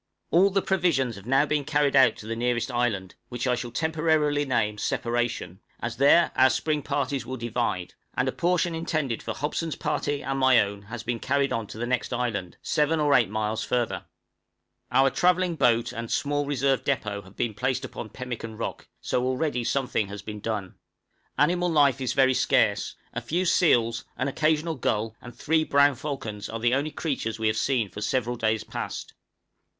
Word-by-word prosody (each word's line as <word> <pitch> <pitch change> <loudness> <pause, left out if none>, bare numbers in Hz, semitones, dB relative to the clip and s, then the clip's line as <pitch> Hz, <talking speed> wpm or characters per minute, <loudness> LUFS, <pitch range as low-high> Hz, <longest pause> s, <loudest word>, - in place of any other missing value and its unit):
_ - - -57 0.3
All 185 +4 +5
the 195 0 0
provisions 165 - +1
have 95 +3 -12
now 135 +3 +4
been 150 -1 0
carried 145 -1 +1
out 130 -5 +6
to - - -10
the 115 +1 -3
nearest 120 +2 0
island, 110 -7 -1 0.2
which 125 0 -3
I 125 - +2
shall 120 0 -3
temporarily 155 +1 +1
name 105 -5 0
Separation, 120 -8 -2 0.2
as 115 0 -4
there 145 +6 +5
our 130 0 +6
spring 150 +1 0
parties 140 -1 -1
will 130 +2 -5
divide; 115 -6 -2 0.2
and - - +1
a - - +1
portion 175 0 +1
intended 155 -7 -2
for - - -4
Hobson's 155 +2 -2
party 145 -1 -2
and 135 +1 -2
my 130 -2 +6
own 100 -1 -1
has 110 +3 -8
been 120 -1 -2
carried 140 +2 +1
on 115 -2 -2
to - - -9
the 120 - -2
next 125 -1 -1
island 115 -8 -2
7 150 +2 +1
or 145 -1 +3
8 120 -7 +4
miles 110 +1 -2
further. 120 -2 -1 0.9
Our 135 0 +4
travelling 180 -1 +2
boat 120 -5 +2
and 115 -1 -5
a - - -9
small 145 0 0
reserve 135 -1 +1
depôt 105 -7 -2
have 95 +2 -17
been 115 - -1
placed 130 +5 -1
upon 110 - -7
Pemmican 115 -3 -6
Rock, 115 - -5
so 125 - 0
already 130 -1 0
something 125 -5 0
has 100 0 -8
been 105 0 -6
done. 105 -3 -3 0.6
Animal 175 +5 +2
life 140 -5 +3
is 130 - -1
very 130 -1 +4
scarce; - - +2 0.2
a - - -3
few 180 +4 -1
seals, 115 -10 +3
an 130 - 0
occasional 155 +3 +1
gull, 110 -5 -1
and 120 0 -11
three 160 +5 +1
brown 140 -1 +4
falcons, 120 -7 -5
are 115 - -4
the 120 +2 +2
only 140 +3 +1
creatures 135 -8 -3
we 110 - -3
have 110 0 +2
seen 125 -4 +1
for 100 +2 -9
several 120 +2 0
days 110 -2 0
past. - - -6
130 Hz, 190 wpm, -26 LUFS, 115-145 Hz, 0.9 s, out